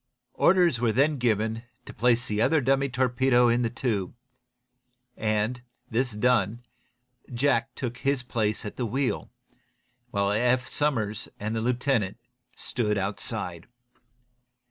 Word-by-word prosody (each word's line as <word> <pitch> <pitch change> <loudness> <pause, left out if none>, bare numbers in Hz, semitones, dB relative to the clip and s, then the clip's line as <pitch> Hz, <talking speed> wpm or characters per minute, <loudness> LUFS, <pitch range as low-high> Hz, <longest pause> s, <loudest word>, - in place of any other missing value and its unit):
Orders 175 -8 +4
were 120 -1 +2
then 140 +6 +2
given 110 -2 0 0.2
to - - -9
place 120 +2 +2
the 105 0 -1
other 160 +6 +4
dummy 135 +1 +2
torpedo 125 0 +3
in 120 +1 +2
the 115 - +1
tube, 115 -5 -2 1.0
and 110 +3 -1 0.3
this 125 +1 0
done, 115 0 +1 0.7
Jack 130 0 +1
took 120 -2 -4
his 140 -2 0
place 110 -4 -1
at 105 - -7
the 125 - -1
wheel, 125 -1 -1 0.8
while 100 -3 0
Eph 125 +4 +2
Somers 115 -9 -1
and 110 +2 -3
the 110 - -1
lieutenant 120 -4 0 0.4
stood 105 -4 -1
outside. 100 -3 -3
120 Hz, 125 wpm, -27 LUFS, 110-130 Hz, 1.0 s, Orders